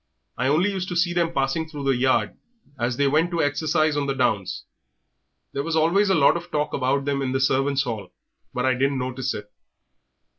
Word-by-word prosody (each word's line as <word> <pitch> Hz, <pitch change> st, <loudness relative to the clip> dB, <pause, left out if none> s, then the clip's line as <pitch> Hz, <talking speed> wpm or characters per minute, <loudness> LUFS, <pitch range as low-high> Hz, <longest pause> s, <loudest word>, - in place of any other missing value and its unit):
I 125 Hz, -, 0 dB
only 170 Hz, +8 st, +2 dB
used 185 Hz, -2 st, -3 dB
to 175 Hz, -, -4 dB
see 175 Hz, 0 st, +2 dB
them 170 Hz, -1 st, +1 dB
passing 150 Hz, +2 st, -1 dB
through 145 Hz, -3 st, -7 dB
the 135 Hz, -1 st, +2 dB
yard 130 Hz, +1 st, +1 dB, 0.4 s
as 120 Hz, 0 st, -1 dB
they 140 Hz, -, +3 dB
went 155 Hz, +5 st, +2 dB
to 170 Hz, -2 st, 0 dB
exercise 155 Hz, +1 st, +1 dB
on 145 Hz, -1 st, -1 dB
the 135 Hz, -, -1 dB
downs. 100 Hz, -8 st, -1 dB, 0.9 s
There 140 Hz, -, -1 dB
was 165 Hz, +3 st, -2 dB
always 175 Hz, +6 st, +3 dB
a 190 Hz, -, +4 dB
lot 140 Hz, 0 st, +5 dB
of 170 Hz, +1 st, -5 dB
talk 150 Hz, -2 st, -1 dB
about 135 Hz, +1 st, 0 dB
them 140 Hz, -1 st, -1 dB
in 130 Hz, -1 st, -1 dB
the 135 Hz, -, +1 dB
servants' 135 Hz, +1 st, +2 dB
hall, 110 Hz, -7 st, -5 dB, 0.4 s
but -, -, -2 dB
I 130 Hz, -, +3 dB
didn't 135 Hz, +2 st, 0 dB
notice 130 Hz, 0 st, -3 dB
it. 105 Hz, 0 st, -9 dB
140 Hz, 210 wpm, -24 LUFS, 130-160 Hz, 0.9 s, lot